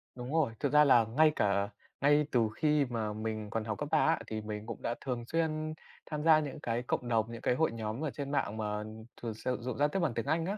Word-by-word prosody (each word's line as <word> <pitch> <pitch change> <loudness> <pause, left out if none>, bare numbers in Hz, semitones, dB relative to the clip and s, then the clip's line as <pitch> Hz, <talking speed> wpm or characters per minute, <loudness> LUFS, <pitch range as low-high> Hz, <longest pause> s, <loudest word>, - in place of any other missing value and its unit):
Đúng 125 +3 -6
rồi, 155 -8 +2
thực 145 0 -1
ra 150 - +8
là 125 -5 +6
ngay 150 +8 +4
cả 100 0 +1 0.3
ngay 145 +1 +4
từ 115 -3 +3
khi 150 0 +3
mà 115 -4 -3
mình 110 0 -4
còn 115 +1 -2
học 110 -2 -3
cấp 145 0 -4
3 160 - +4
á, 160 - +3
thì 110 0 -4
mình 105 0 -5
cũng 115 - -7
đã 120 - -1
thường 125 -3 -3
xuyên 155 0 -1 0.3
tham 150 -1 -4
gia 160 -1 +7
những 145 -3 -5
cái 120 +1 -2
cộng 120 0 -2
đồng, 115 -1 +1
những 115 - -7
cái 125 - +2
hội 160 +4 +2
nhóm 115 +3 -4
ở 155 - 0
trên 140 0 -5
mạng 110 -6 -1
mà 105 -1 -2 0.4
thường 115 -2 -3
sử 125 +4 -2
dụng 125 0 -4
giao 145 +1 +4
tiếp 195 - -2
bằng 165 -8 +1
tiếng 115 +1 -2
Anh 160 +3 +1
á. 200 +3 -2
125 Hz, 260 wpm, -32 LUFS, 110-150 Hz, 0.4 s, ra